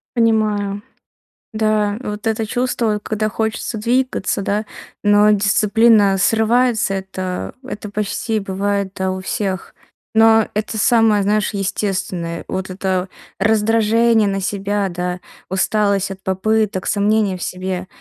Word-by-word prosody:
Понимаю. 215 Hz, -3 st, +1 dB, 0.7 s
Да, 215 Hz, -1 st, +1 dB
вот 210 Hz, -2 st, -5 dB
это 225 Hz, 0 st, 0 dB
чувство, 230 Hz, -2 st, -1 dB
когда 215 Hz, 0 st, -1 dB
хочется 220 Hz, +1 st, -3 dB
двигаться, 240 Hz, -2 st, 0 dB
да, 205 Hz, +2 st, -1 dB, 0.4 s
но 205 Hz, 0 st, +5 dB
дисциплина 210 Hz, 0 st, +4 dB
срывается, 225 Hz, +1 st, +2 dB
это 185 Hz, -1 st, -4 dB
это 210 Hz, -5 st, -6 dB
почти 215 Hz, +2 st, -2 dB
бывает, 200 Hz, 0 st, -2 dB
да, 190 Hz, -1 st, -1 dB
у 185 Hz, -, -4 dB
всех. 190 Hz, 0 st, -3 dB, 0.4 s
Но 225 Hz, 0 st, +5 dB
это 215 Hz, +1 st, -3 dB
самое, 220 Hz, -2 st, +3 dB
знаешь, 210 Hz, +2 st, +1 dB
естественное. 185 Hz, -4 st, -2 dB
Вот 190 Hz, 0 st, -4 dB
это 185 Hz, 0 st, -2 dB, 0.3 s
раздражение 220 Hz, +1 st, +3 dB
на 195 Hz, 0 st, -1 dB
себя, 200 Hz, +1 st, -1 dB
да, 180 Hz, +1 st, -3 dB, 0.3 s
усталость 200 Hz, +1 st, +1 dB
от 190 Hz, 0 st, -8 dB
попыток, 195 Hz, +1 st, 0 dB
сомнения 205 Hz, -2 st, +1 dB
в -, -, -6 dB
себе. 185 Hz, 0 st, -4 dB
205 Hz, 120 wpm, -19 LUFS, 195-220 Hz, 0.7 s, но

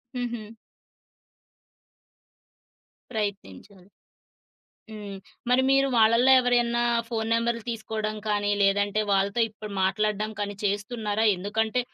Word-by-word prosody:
హుహు. 235 Hz, -3 st, -5 dB, 2.6 s
ప్రయత్నించాలి. 200 Hz, -, -6 dB, 1.0 s
హ్మ్. 205 Hz, -2 st, -8 dB, 0.3 s
మరి 250 Hz, +1 st, +4 dB
మీరు 275 Hz, 0 st, +4 dB
వాళ్ళల్లో 230 Hz, +3 st, +5 dB
ఎవరియన్న 240 Hz, -1 st, +1 dB, 0.3 s
ఫోను 225 Hz, -2 st, -3 dB
నెంబరులు 230 Hz, 0 st, 0 dB
తీసుకోవడం 220 Hz, -1 st, -3 dB
కానీ, 205 Hz, 0 st, +1 dB
లేదంటే 205 Hz, +1 st, +2 dB
వాళ్ళతో 200 Hz, +3 st, +1 dB
ఇప్పుడు 215 Hz, 0 st, -10 dB
మాట్లాడడం 210 Hz, +2 st, 0 dB
కానీ, 205 Hz, 0 st, -3 dB
చేస్తున్నారా? 210 Hz, +1 st, -1 dB
ఎందుకంటే 220 Hz, +5 st, -1 dB
215 Hz, 90 wpm, -26 LUFS, 205-230 Hz, 2.6 s, వాళ్ళల్లో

